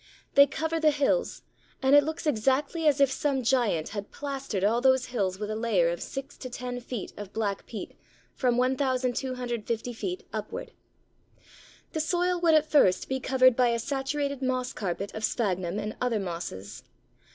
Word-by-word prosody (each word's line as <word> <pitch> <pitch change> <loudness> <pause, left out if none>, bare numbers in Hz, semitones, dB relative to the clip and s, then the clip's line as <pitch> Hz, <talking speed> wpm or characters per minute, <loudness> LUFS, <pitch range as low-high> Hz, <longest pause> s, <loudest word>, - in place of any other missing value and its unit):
They 280 0 +8
cover 320 +3 -2
the 315 -1 +5
hills, 290 - 0 0.4
and 265 0 +4
it 290 - +8
looks 315 +2 -4
exactly 290 +5 +1
as 290 -1 +4
if 275 -1 +5
some 270 -1 0
giant 230 -10 +1
had 205 -1 -5
plastered 275 -8 -4
all 225 +4 +3
those 260 -1 +4
hills 190 -5 0
with 210 +1 -4
a - - -2
layer 215 -7 +2
of 170 - -3
six 270 +1 -6
to 255 - -6
ten 245 0 -5
feet 240 -3 -6
of 205 -1 -8
black 205 -3 -2
peat 220 - -7 0.4
from 245 -3 +1
1250 250 -3 -1
feet 360 +10 -4
upwards. - - -5 1.2
The 320 - -1
soil 355 +2 +1
would 330 -2 +5
at 310 -1 +4
first 230 -12 +4
be 265 0 -1
covered 255 -1 +4
by 250 0 +4
a 235 0 +1
saturated 280 +2 -2
moss 255 -1 -1
carpet 195 0 -3
of 215 - -6
Sphagnum 190 -5 0
and 210 +1 -3
other 245 -3 +1
mosses. 125 - -6
250 Hz, 170 wpm, -28 LUFS, 215-280 Hz, 1.2 s, They